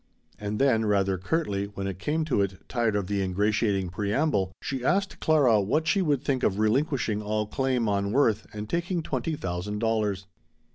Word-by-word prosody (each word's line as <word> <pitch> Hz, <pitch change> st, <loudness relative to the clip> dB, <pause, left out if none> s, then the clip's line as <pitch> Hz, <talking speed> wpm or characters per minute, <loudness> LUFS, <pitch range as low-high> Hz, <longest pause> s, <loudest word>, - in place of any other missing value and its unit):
And 105 Hz, 0 st, -3 dB
then, 115 Hz, -4 st, +3 dB
rather 100 Hz, -2 st, +1 dB
curtly 100 Hz, -, -1 dB
when 100 Hz, -1 st, -6 dB
it 95 Hz, -2 st, -4 dB
came 155 Hz, +6 st, -1 dB
to 135 Hz, -9 st, +1 dB
it, 95 Hz, -2 st, -4 dB
tired 115 Hz, -4 st, 0 dB
of 100 Hz, -2 st, 0 dB
the 100 Hz, +1 st, -1 dB
ingratiating 100 Hz, 0 st, +1 dB
preamble, 100 Hz, -, 0 dB
she 135 Hz, -3 st, -4 dB
asked 195 Hz, +7 st, 0 dB
Clara 135 Hz, -9 st, +4 dB
what 150 Hz, +11 st, 0 dB
she 200 Hz, -, +3 dB
would 145 Hz, -7 st, +1 dB
think 130 Hz, -3 st, 0 dB
of 95 Hz, -, +1 dB
relinquishing 110 Hz, 0 st, +1 dB
all 105 Hz, 0 st, -1 dB
claim 125 Hz, +1 st, 0 dB
on 100 Hz, -1 st, 0 dB
Worth 110 Hz, -4 st, +2 dB
and 105 Hz, 0 st, -6 dB
taking 170 Hz, -, -1 dB
twenty 160 Hz, 0 st, -2 dB
thousand 95 Hz, -1 st, -4 dB
dollars. 105 Hz, -3 st, 0 dB
105 Hz, 180 wpm, -27 LUFS, 100-135 Hz, -, Clara